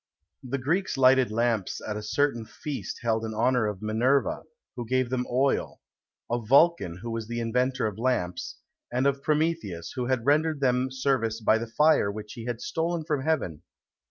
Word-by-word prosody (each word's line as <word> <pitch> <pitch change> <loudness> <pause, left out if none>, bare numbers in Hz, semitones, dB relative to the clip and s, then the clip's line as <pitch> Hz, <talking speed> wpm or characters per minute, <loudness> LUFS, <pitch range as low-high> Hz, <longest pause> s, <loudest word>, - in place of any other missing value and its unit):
The 135 0 -3
Greeks 165 +7 -1
lighted 130 -2 +5
lamps 115 -3 0
at 105 - -5
a 105 - -4
certain 120 +2 0
feast 140 +5 -6
held 115 -1 +1
in 110 -1 -4
honour 120 0 +2
of 105 -1 -5
Minerva, 120 +6 +1 0.3
who 120 - -4
gave 130 +1 0
them 125 -1 -1
oil; 130 +3 0 0.5
of 120 -2 -3
Vulcan, 140 - +4
who 120 - -4
was 115 -1 -4
the 120 0 -3
inventor 125 +2 0
of 105 -1 -3
lamps; 115 -8 -1 0.4
and 125 +2 0
of 140 0 +1
Prometheus, 150 - -1
who 125 -2 -3
had 125 -3 0
rendered 155 +1 +2
them 130 -1 +1
service 130 -4 0
by 110 0 +3
the 115 - -4
fire 115 -3 +3
which 105 0 -8
he 115 -3 -8
had 120 -1 -4
stolen 165 0 -2
from 150 -4 -1
heaven. 135 - -1
125 Hz, 180 wpm, -27 LUFS, 110-140 Hz, 0.5 s, lighted